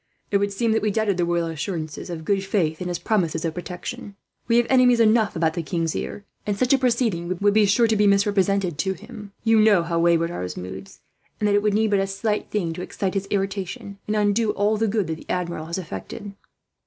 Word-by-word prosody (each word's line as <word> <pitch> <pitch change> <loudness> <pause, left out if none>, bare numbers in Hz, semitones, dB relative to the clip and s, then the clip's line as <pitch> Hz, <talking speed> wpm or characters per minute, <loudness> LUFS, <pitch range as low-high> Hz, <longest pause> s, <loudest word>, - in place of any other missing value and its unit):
"It 200 - +4
would 200 0 0
seem 225 +3 0
that 220 - +2
we 215 - +1
doubted 205 -2 0
the 175 - +1
royal 170 0 0
assurances 160 -1 -4
of 160 -2 -6
good 195 0 +1
faith, 175 -5 0
and 180 - -3
his 175 - -2
promises 170 -4 0
of 160 - -1
protection. 180 +3 -7 0.3
We 230 0 +3
have 240 - +4
enemies 250 -2 +5
enough 220 -1 +3
about 160 -1 +1
the 170 - -2
king's 165 -1 -2
ear, 205 - -5 0.2
and 205 -1 -2
such 255 +4 +2
a 270 - +4
proceeding 225 -9 0
would 205 0 +3
be 215 -1 +4
surely 210 0 +3
misrepresented 200 -4 +2
to 190 +5 0
him. 210 0 -11
You 225 -1 +4
know 210 -5 +5
how 170 0 -1
wayward 170 0 +3
are - - -5
his 90 0 -5
moods, 95 +2 -8 0.4
and 210 - +1
that 205 - +2
it 205 - +4
would 210 -1 +1
need 220 0 +2
but 200 - +3
a 195 - 0
slight 210 +2 -2
thing 175 -6 -1
to 180 - -6
excite 190 +1 -3
his 195 -1 -2
irritation, 195 0 -3
and 210 - 0
undo 210 +1 +2
all 210 +1 +1
the 220 +1 +1
good 210 -1 0
that 160 0 -4
the - - -15
Admiral 170 -3 -2
has 170 - -3
effected." 190 - -7
200 Hz, 230 wpm, -23 LUFS, 170-215 Hz, 0.4 s, enemies